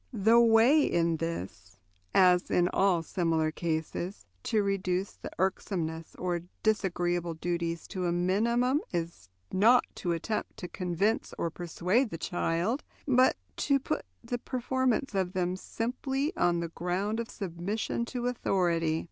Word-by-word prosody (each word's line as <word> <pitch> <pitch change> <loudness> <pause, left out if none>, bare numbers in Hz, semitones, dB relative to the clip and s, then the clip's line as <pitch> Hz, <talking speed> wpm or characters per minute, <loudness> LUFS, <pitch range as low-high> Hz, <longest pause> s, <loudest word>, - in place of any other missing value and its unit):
The 225 0 +4
way 235 +6 +6
in 170 -5 +1
this, 100 - -5 0.3
as 180 -1 +4
in 175 0 +3
all 190 -2 +3
other 165 - -6
similar 165 -3 +1
cases, 165 +3 -3 0.2
to 215 - +1
reduce 195 -1 -1
the - - -8
irksomeness 170 -3 -2
of 175 -1 -2 0.2
disagreeable 175 -5 0
duties 170 0 -2
to 185 -3 -2
a - - +1
minimum 235 - +2
is 165 - -4 0.2
not 230 +6 +5
to 175 - -1
attempt 210 +6 -3
to 180 - -6
convince 180 +5 -1
or 170 - -1
persuade 180 - 0
the 165 - -5
child, 175 - -1 0.2
but 255 -1 +4 0.2
to 280 -1 +3
put - - -2 0.2
the 245 - -3
performance 260 0 -1
of 190 -2 0
them 180 -1 0
simply 265 - -2
on 170 -1 +2
the 170 - -3
ground 185 +6 -2
of 235 - -4
submission 195 +5 -3
to 245 0 -4
authority. 170 -9 +1
185 Hz, 140 wpm, -29 LUFS, 170-225 Hz, 0.3 s, way